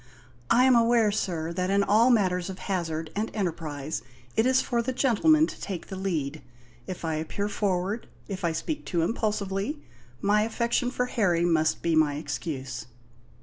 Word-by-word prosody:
"I 245 - +5
am 260 -1 +6
aware, 230 -2 +4
sir, 170 -5 -2
that 185 +1 -1
in 200 +1 +3
all 220 +5 +4
matters 185 -6 +2
of 190 - -6
hazard 165 -5 -3
and 215 +2 -1
enterprise 160 - -3 0.3
it 220 +3 +3
is 260 0 +4
for 240 -2 0
the 255 +2 -2
gentlemen 295 +5 +4
to - - -9
take 190 -4 -5
the 190 - -5
lead. 160 -6 -2 0.5
If 180 -2 -5
I 160 - 0
appear 160 +6 -2
forward 200 +1 -1 0.2
if 190 -3 -5
I 170 - +2
speak 290 - -3
too 170 -3 0
impulsively 210 - -1 0.4
my 205 +1 +3
affection 235 +2 0
for 250 0 -1
Harry 180 -9 +1
must 160 -2 +2
be 170 -1 +2
my 155 -2 +3
excuse." 135 -4 -5
195 Hz, 170 wpm, -27 LUFS, 165-225 Hz, 0.5 s, am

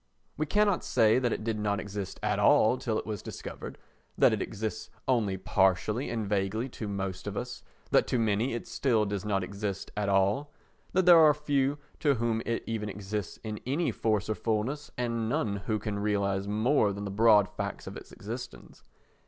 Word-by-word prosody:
We 155 - -2
cannot 205 +2 +2
say 110 +2 +4
that 120 -2 0
it - - -2
did 110 -1 -1
not 105 -1 0
exist 100 -2 -5
at - - +1
all 115 +4 +5
till 115 -4 -1
it - - -3
was 105 -3 -4
discovered, - - -7 0.4
that - - +5
it - - -1
exists 110 +1 -4 0.2
only 110 -7 +1
partially 95 +6 +1
and 110 -3 -2
vaguely 105 +5 -1
to 110 -3 -6
most 95 -1 -4
of 100 0 -4
us, 120 0 -5 0.3
that - - +4
to 125 - +1
many 115 +2 +1
it 120 - -5
still 115 -6 +1
does 100 -1 -3
not 100 -2 0
exist 100 +1 -4
at 105 -1 -1
all, 100 +9 +2 0.4
that 185 0 +3
there 175 -2 +9
are 155 -2 +7
few 145 -1 0 0.2
to 145 -3 +3
whom 115 -1 0
it 115 0 -1
even 110 -2 -3
exists 100 -1 -4
in 110 -1 -4
any 150 +6 +1
force 105 -4 0
or 110 - +1
fullness 115 +8 -2
and 115 -2 -1
none 115 -7 0
who 110 - +1
can 105 -1 -3
realise 100 -1 0
more 110 +1 +2
than 100 +1 -5
the 100 - -4
broad 105 -1 +5
facts 100 -1 -5
of - - -7
its - - -10
existence. - - -8
110 Hz, 195 wpm, -29 LUFS, 100-120 Hz, 0.4 s, there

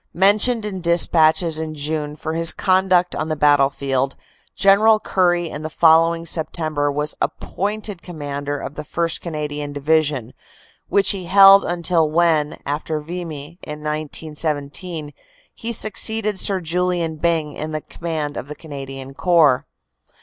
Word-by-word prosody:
Mentioned 210 +5 +3
in 190 -3 -5
despatches 165 -1 +3
in 155 -1 -5
June 150 0 -3
for 160 +1 -5
his 165 0 +5
conduct 185 -2 +2
on 155 - -3
the 155 - -1
battlefield, 140 -2 +1 0.4
General 215 +3 +5
Currie 175 -4 +1
in 150 -1 -7
the 155 - -5
following 165 +1 +3
September 155 -3 -2
was 150 +1 -2
appointed 205 -1 -3
commander 145 -4 -5
of 140 - -7
the 150 - -6
1st. 165 +2 -2
Canadian 150 -3 -5
Division, 145 -4 0 0.6
which 200 -1 +4
he 190 -3 -5
held 195 +2 +7
until 170 -2 +1
when, 155 -2 +1
after 150 +2 -3
Vimy 165 0 -8
in 150 0 -8
1917, 150 +1 -4 0.4
he 230 - -6
succeeded 215 -1 -1
Sir 195 -2 +2
Julian 170 -1 -1
Byng 160 -1 0
in 155 +1 -5
command 155 -4 -5
of 130 - -6
the 150 - -7
Canadian 135 -3 -9
Corps. 155 -5 +3
160 Hz, 135 wpm, -20 LUFS, 150-180 Hz, 0.6 s, held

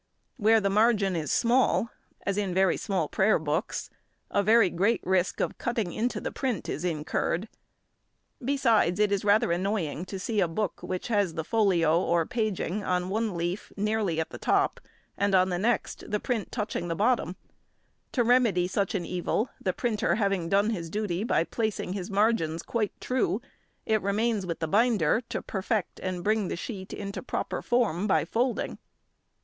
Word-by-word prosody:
Where 225 -1 +5
the 200 -2 0
margin 210 -3 +3
is 155 -4 -2
small, 235 -1 +2 0.3
as 200 - 0
in 200 -3 -1
very 190 -1 +4
small 190 -7 -1
prayer 210 +7 +3
books, 155 +6 -2 0.4
a 200 - +3
very 215 -2 +5
great 200 +7 +2
risk 185 0 +1
of - - -2
cutting 225 -7 -2
into 240 +3 -1
the - - -4
print 250 - -2
is 155 - -3
incurred; 165 +3 -1 1.0
besides, 230 -9 +2
it 210 -1 +3
is 200 -1 0
rather 205 -3 +3
annoying 180 -3 -1
to 195 - -6
see 210 +3 -2
a 185 - +3
book 180 +3 -3
which 185 +4 -4
has 200 -7 +1
the 160 - -2
folio 175 -5 +3
or 170 -2 +1
paging 210 -3 -2
on 180 -1 0
one 215 -2 -1
leaf 175 +4 -3
nearly 210 -5 0
at 160 - -2
the - - -8
top, - - +1 0.4
and 200 -1 +2
on 185 0 +4
the 175 -1 -1
next, 235 +5 -1
the 210 - 0
print 235 -3 -2
touching 210 -6 -3
the 165 - -2
bottom; 210 -3 +1 0.8
to 245 - +2
remedy 230 -7 +3
such 200 +3 -1
an 175 -3 -1
evil, 180 +7 -1
the 185 - +2
printer 215 +2 0
having 195 -5 0
done 200 +3 +3
his 170 -6 -4
duty 205 -1 -2
by 225 - +2
placing 215 -1 -2
his 190 -1 -5
margins 195 -6 +1
quite 220 -4 -2
true, 230 -6 0 0.5
it 220 -1 +2
remains 205 0 0
with 170 - -2
the 160 - 0
binder 215 -1 +3
to - - -3
perfect 200 0 -2
and 185 -2 -4
bring 215 -2 +1
the - - -3
sheet 190 +1 -6
into 200 -1 -5
proper - - -3
form 210 -6 +1
by 195 - +2
folding. 245 +1 -1
200 Hz, 175 wpm, -28 LUFS, 180-220 Hz, 1.0 s, Where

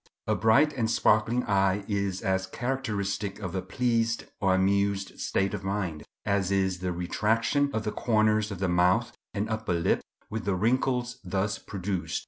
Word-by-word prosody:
A - - +1
bright 125 +8 +4
and 115 -3 0
sparkling 115 +2 +3
eye 100 -1 +1
is 100 -2 -1
as 95 0 0
characteristic 105 -5 -2
of 95 -4 -5
a 95 - -1
pleased 115 +3 0
or 95 -3 +3
amused 100 +1 +1
state 95 +1 0
of 100 -2 -4
mind, 95 -6 -3 0.2
as 100 -2 +1
is 95 -2 +1
the 90 0 -2
retraction 110 +10 +1
of 110 -4 -2
the 105 - -2
corners 110 -1 +2
of 100 - -5
the 95 +1 0
mouth 90 +1 +2 0.2
and 100 +2 -1
upper 110 -4 -2
lip 85 -1 +1 0.3
with 110 0 -4
the 100 -2 +1
wrinkles 125 +4 0
thus 100 +2 -1
produced. 95 -2 -3
100 Hz, 165 wpm, -28 LUFS, 95-110 Hz, 0.3 s, bright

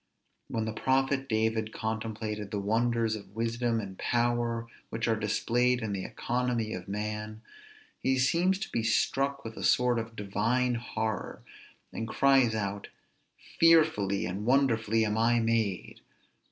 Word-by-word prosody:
When 110 -1 -2
the 110 - -3
prophet 135 +3 +1
David 110 0 0
contemplated 110 -2 -4
the 105 - -3
wonders 115 +2 +1
of 100 -1 -11
wisdom 115 +1 0
and 95 -3 -7
power 120 -1 0 0.2
which 115 +1 -2
are 115 - +3
displayed 115 +3 +1
in 105 -2 -2
the 95 -1 -3
economy 120 -2 -2
of 90 - -6
man, 105 +2 -4 0.6
he 130 0 +1
seems 170 +8 +2
to - - -5
be 115 - 0
struck 135 +5 0
with 110 0 -6
a - - -5
sort 125 -1 +3
of 115 0 -6
divine 120 +5 0
horror, 110 -2 -3 0.5
and 115 - -4
cries 135 -2 +3
out, 100 -1 -3 0.7
fearfully 155 -13 +4
and 95 +4 -4
wonderfully 115 -3 +2
am 105 +1 -1
I 120 +1 +3
made! 115 -4 -1
115 Hz, 140 wpm, -29 LUFS, 110-125 Hz, 0.7 s, fearfully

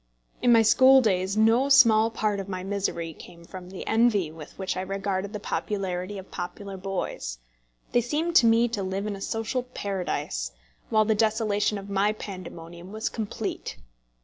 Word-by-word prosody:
In 245 - +4
my 230 -1 +6
school 260 +5 +7
days 195 -4 +1
no 230 +5 +4
small 230 -5 +6
part 215 -2 -1
of 195 0 -6
my 185 -1 -4
misery 190 -4 -2
came 170 +2 -14
from 180 0 -10
the 190 - -7
envy 220 -7 +2
with 155 -1 -12
which 190 -1 -2
I 185 - -2
regarded 195 0 -3
the 210 - -5
popularity 195 -2 -3
of 190 0 -10
popular 195 +2 -6
boys. 185 - -4 0.5
They 240 - +3
seemed 310 +8 -2
to 235 - +6
me 230 +1 +4
to 220 -3 -3
live 190 +1 -3
in 210 -1 -3
a 195 - -10
social 225 +5 -2
paradise, 190 - -3 0.4
while 215 -1 +3
the 220 - +3
desolation 215 -1 +1
of 195 0 -8
my 200 +1 +1
pandemonium 175 -3 -9
was 220 +1 -2
complete. 220 -3 -5
200 Hz, 175 wpm, -26 LUFS, 185-225 Hz, 0.5 s, school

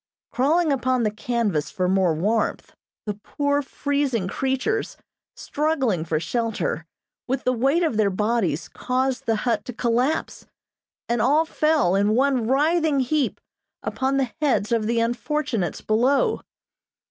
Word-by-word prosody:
Crawling 310 +5 +2
upon 255 -2 +1
the 215 - +1
canvas 215 -7 -1
for 185 -3 -1
more 185 -3 +2
warmth, 210 +7 -1 0.3
the 210 - -2
poor, 285 +7 -1
freezing 275 -6 -1
creatures, 270 - -1 0.4
struggling 275 - -1
for 155 -1 0
shelter, 225 -5 -2 0.4
with 265 +1 -1
the 255 - +2
weight 275 +8 +2
of 310 -10 0
their 215 -2 +3
bodies 195 -5 0
caused 255 0 -2
the 225 - +3
hut 225 -4 +1
to 250 - -6
collapse, 245 +6 -1 0.6
and 235 -1 0
all 295 +7 +3
fell, 305 - +2
in 205 +2 +2
one 260 -3 +2
writhing 305 +2 +2
heap, 275 +2 0 0.4
upon 265 +1 -1
the 265 -3 0
heads 260 -8 +1
of 225 -2 +1
the 230 0 +1
unfortunates 240 - -1
below. 265 - +2
245 Hz, 135 wpm, -23 LUFS, 215-280 Hz, 0.6 s, their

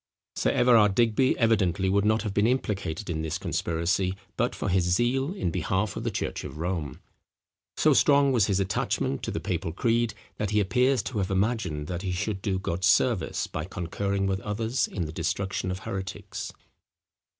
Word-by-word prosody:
Sir - - +1
Everard 110 -5 +5
Digby 120 +3 +3
evidently 100 -6 +2
would 100 +2 +2
not 110 +1 +2
have 105 -3 -3
been 105 +2 +3
implicated 100 -8 -1
in 80 -3 -2
this 80 -1 -2
conspiracy, 90 +3 -1 0.2
but - - 0
for - - -3
his 95 -1 +2
zeal 120 - +1
in 90 - -1
behalf 95 +5 -1
of - - -4
the - - 0
church - - -3
of - - -7
Rome. 85 -4 -3 0.8
So - - +4
strong 140 -1 +5
was 115 -6 +3
his 100 -2 +1
attachment 95 -7 -1
to - - -3
the - - -2
papal 80 - -2
creed, 115 +4 +1 0.2
that 105 - -1
he 105 +1 +2
appears 125 +5 +2
to 110 -2 -3
have 95 - -1
imagined 95 -6 0
that 90 +2 -4
he 95 -2 -2
should 95 +2 -2
do 95 -2 0
God 90 -1 -3
service 100 -1 +2
by 80 - -5
concurring 95 +3 -2
with 95 0 0
others 110 +5 -1
in 90 -4 -3
the 80 - -6
destruction 95 +4 -2
of 90 - -2
heretics. 95 -2 -5
95 Hz, 185 wpm, -27 LUFS, 90-110 Hz, 0.8 s, Everard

